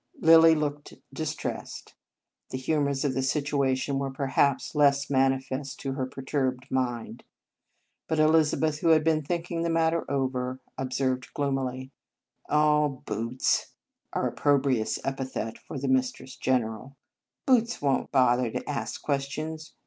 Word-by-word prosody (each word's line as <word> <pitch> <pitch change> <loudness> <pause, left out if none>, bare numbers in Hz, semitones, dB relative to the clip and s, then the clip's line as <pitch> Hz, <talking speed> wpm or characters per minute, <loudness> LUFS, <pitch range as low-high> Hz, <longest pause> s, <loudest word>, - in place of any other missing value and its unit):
Lilly 165 -3 +7
looked 145 -1 -3 0.2
distressed. - - -5 0.6
The 130 - -4
hu 140 +4 0
mours 140 0 0
of 135 - +1
the 130 - 0
situation 140 -1 0
were, 135 0 -2
perhaps, 135 0 0
less 140 -2 +3
manifest 135 0 0
to 135 - -3
her 130 -1 -2
perturbed 130 -1 -3
mind. 125 -3 -2 0.8
But 160 - 0
Elizabeth, 155 0 +3
who 170 - -1
had 160 -1 +5
been 160 -1 +2
thinking 170 +2 -3
the 170 - 0
matter 165 0 +2
over, 130 -2 -1 0.2
observed 130 0 -2
gloomily: 135 -2 -2 0.6
"Oh, 150 -2 +2
Boots 115 +3 -1
" - - -51
(our - - 0
opprobrious 135 -6 +1
epithet 130 -4 -4
for - - -8
the 135 +1 -3
Mistress 130 0 0
General) 125 +1 -1 0.5
"won 250 -4 +6
t 145 - -1
bother 125 -2 +3
to - - -5
ask - - -4
questions. 155 +3 -3
135 Hz, 135 wpm, -27 LUFS, 130-150 Hz, 0.8 s, Lilly